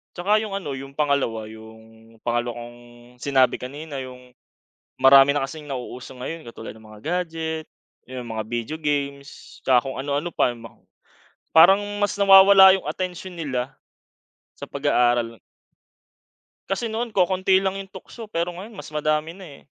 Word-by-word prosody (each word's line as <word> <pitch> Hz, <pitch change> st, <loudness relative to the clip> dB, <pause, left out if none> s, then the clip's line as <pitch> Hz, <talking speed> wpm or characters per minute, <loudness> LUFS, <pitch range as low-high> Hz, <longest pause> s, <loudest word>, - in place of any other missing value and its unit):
Tsaka 210 Hz, +5 st, +2 dB
yung 215 Hz, -, -6 dB
ano, 190 Hz, -8 st, -4 dB
yung 135 Hz, +1 st, -8 dB
pangalawa. 140 Hz, -7 st, -1 dB
Yung 110 Hz, +1 st, -15 dB
pangalawa 120 Hz, +1 st, -2 dB
kong 120 Hz, 0 st, -10 dB, 0.4 s
sinabi 130 Hz, -1 st, +2 dB
kanina. 145 Hz, +4 st, -8 dB
Yung 125 Hz, -1 st, -13 dB, 0.7 s
marami 135 Hz, +1 st, +7 dB
na 145 Hz, -, 0 dB
kasing 150 Hz, +2 st, -10 dB
nauuso 125 Hz, -2 st, -7 dB
ngayon 160 Hz, +6 st, -6 dB
katulad 115 Hz, -1 st, -9 dB
ng 110 Hz, -, -17 dB
mga 105 Hz, -1 st, -13 dB
gadget, 160 Hz, -1 st, -3 dB, 0.4 s
yung 125 Hz, -1 st, -7 dB
mga 110 Hz, -, -2 dB
video 120 Hz, +6 st, -3 dB
games, 140 Hz, -1 st, -4 dB
tsaka 125 Hz, -2 st, +5 dB
kung 135 Hz, -, -5 dB
ano-ano 145 Hz, +4 st, -2 dB
pa, -, -, +2 dB
yung 115 Hz, -, -14 dB
ma -, -, -12 dB, 0.8 s
parang 185 Hz, +5 st, +8 dB, 0.2 s
mas 205 Hz, -, +1 dB
nawawala 195 Hz, -1 st, +8 dB
yung 190 Hz, -, -5 dB
atensyon 185 Hz, 0 st, -5 dB
nila 135 Hz, -4 st, -3 dB, 0.8 s
sa -, -, -7 dB
pag 140 Hz, +1 st, -5 dB
aaral. 120 Hz, -3 st, +2 dB, 1.3 s
Kasi 195 Hz, +5 st, -1 dB
noon 235 Hz, +2 st, -2 dB
kokonti 190 Hz, 0 st, +3 dB
lang 195 Hz, 0 st, -1 dB
yung 195 Hz, -, -8 dB
tukso 210 Hz, +4 st, -11 dB
pero 170 Hz, -1 st, -2 dB
ngayon 200 Hz, +6 st, -10 dB
mas 150 Hz, -, -9 dB
madami 155 Hz, +1 st, 0 dB
na 190 Hz, +1 st, -12 dB, 0.2 s
eh. -, -, -24 dB
145 Hz, 155 wpm, -23 LUFS, 125-180 Hz, 1.3 s, parang